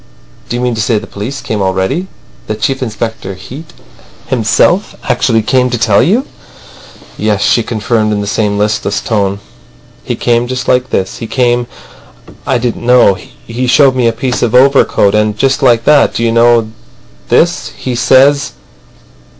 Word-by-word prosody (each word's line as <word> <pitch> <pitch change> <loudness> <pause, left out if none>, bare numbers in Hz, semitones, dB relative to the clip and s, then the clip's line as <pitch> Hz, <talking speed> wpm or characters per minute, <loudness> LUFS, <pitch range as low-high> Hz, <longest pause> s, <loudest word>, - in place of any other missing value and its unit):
Do - - -3
you 120 - -2
mean 125 -1 0
to 110 - -2
say 115 0 +1
the 105 - -5
police 115 +8 -6
came 110 -2 -3
already? 95 - -1 0.4
That 110 0 -4
Chief 135 +4 -1
Inspector 115 -4 -4
Heat 135 - -11 0.5
himself 130 - +1
actually 120 -3 +1
came 125 +2 +1
to 120 - -2
tell 105 -3 +2
you." 210 - +1 0.9
"Yes," 105 -2 0
she 120 - +2
confirmed 110 -1 -1
in 105 - -1
the 100 - -3
same 100 0 -1
listless 105 -1 -1
tone. 100 -3 -1 0.6
"He - - -3
came 120 0 0
just 130 0 -4
like 125 0 +1
this. 95 - -2
He 115 - -6
came. 120 -1 0 0.8
I 130 - +2
didn't 120 -1 -3
know. 125 -4 +4 0.3
He 125 +2 -3
showed 135 +1 +4
me 125 -2 +1
a - - +3
piece 125 +2 -3
of 120 -1 0
overcoat, 130 -6 +3
and—just 105 +6 0
like 120 -4 +3
that. 150 +1 +3
Do 115 - -1
you 115 - +1
know 115 -1 +3 0.6
this? - - +1
he 130 - -4
says." 130 +2 +3
120 Hz, 165 wpm, -12 LUFS, 110-130 Hz, 0.9 s, know